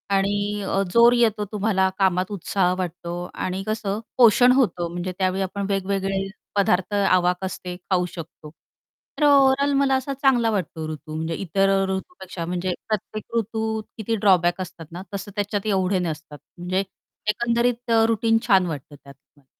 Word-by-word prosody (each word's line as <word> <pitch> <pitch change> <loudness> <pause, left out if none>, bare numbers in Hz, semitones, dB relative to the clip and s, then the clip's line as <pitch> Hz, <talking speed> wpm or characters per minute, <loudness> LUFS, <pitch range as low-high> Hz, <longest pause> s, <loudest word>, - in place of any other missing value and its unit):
आणि 205 +1 0
अ, 195 - +1
जोर 235 +1 +7
येतो 220 -4 +2
तुम्हाला, 195 -2 +1
कामात 185 0 +1
उत्साह 185 -1 0
वाटतो 175 -1 -4 0.2
आणि 185 +1 -3
कसं 215 -2 -2 0.2
पोषण 245 +1 +6
होतं 180 -10 +1
म्हणजे 175 +1 -4
त्यावेळी 190 0 0
आपण 200 +1 -3
वेगवेगळे 195 0 -1 0.3
पदार्थ 190 0 +1
आवाक 185 -2 +2
असते 180 -1 -5
खाऊ 180 0 0
शकतो. 155 -2 -10 0.7
तर 300 - +1
ओव्हरऑल 280 0 +5
मला 270 -1 +3
असा 265 +1 -2
चांगला 260 -4 +2
वाटतो 160 -5 -3
ऋतू 155 0 -8
म्हणजे 160 +1 -2
इतर 195 +2 +1 0.2
ऋतूपेक्षा 190 - -5
म्हणजे 180 +1 -2
प्रत्येक 215 +2 -3
ऋतूत 220 0 -2
किती 225 +1 -1
ड्रॉबॅक 185 -3 +3
असतात 175 -2 -8
ना 175 +2 -7
तसं 200 +1 -5
त्याच्यात 205 0 -2
एवढे 190 -1 +1
नसतात. 160 -3 -5 0.2
म्हणजे 180 +2 -1 0.5
एकंदरीत 235 +2 0 0.2
रुटीन 225 0 +2
छान 190 -4 +5
वाटतं 145 -2 -6
त्यात 140 0 -15 0.2
मला. 140 - -25
195 Hz, 150 wpm, -23 LUFS, 180-220 Hz, 0.7 s, जोर